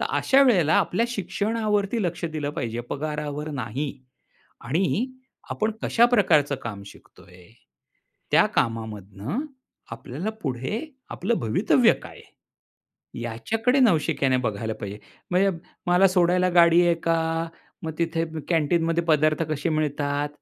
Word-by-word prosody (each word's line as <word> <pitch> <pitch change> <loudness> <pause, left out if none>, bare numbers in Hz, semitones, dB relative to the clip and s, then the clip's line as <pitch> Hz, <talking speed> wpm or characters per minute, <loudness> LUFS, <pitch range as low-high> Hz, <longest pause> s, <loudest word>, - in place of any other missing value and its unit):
तर - - 0
अशा 275 +1 +4
वेळेला 180 - +4
आपल्या 200 +4 +1
शिक्षणावरती 210 +1 -1
लक्ष 175 -2 -3
दिलं 155 -3 -3
पाहिजे, 120 -6 -4
पगारावर 150 0 -4
नाही. 135 +2 -3 0.7
आणि 180 - 0 0.4
आपण 215 +1 0
कशा 235 +1 +4
प्रकारचं 165 - +3
काम 105 -4 -6
शिकतोय, 90 -2 -16 0.8
त्या - - +5
कामामधून 110 - -2 0.5
आपल्याला 135 - -5
पुढे 130 - -2 0.3
आपलं 210 +7 -1
भवितव्य 110 -1 +3
काय - - -11
आहे? - - -26 0.9
याच्याकडे 225 - 0
नवशिक्याने 155 - +3
बघायला 110 +1 -3
पाहिजे. 105 -1 -6 0.3
म्हणजे 190 +2 +3 0.4
मला 180 +2 +5
सोडायला 180 0 +3
गाडी 170 0 +6
आहे 170 - +4
का? 165 0 0 0.4
मग 160 -1 -4
तिथे 165 -1 0 0.2
कॅन्टीनमध्ये 165 +1 +1
पदार्थ 155 -1 +2
कसे 150 +2 -1
मिळतात? 145 -2 -1
160 Hz, 120 wpm, -24 LUFS, 135-185 Hz, 0.9 s, गाडी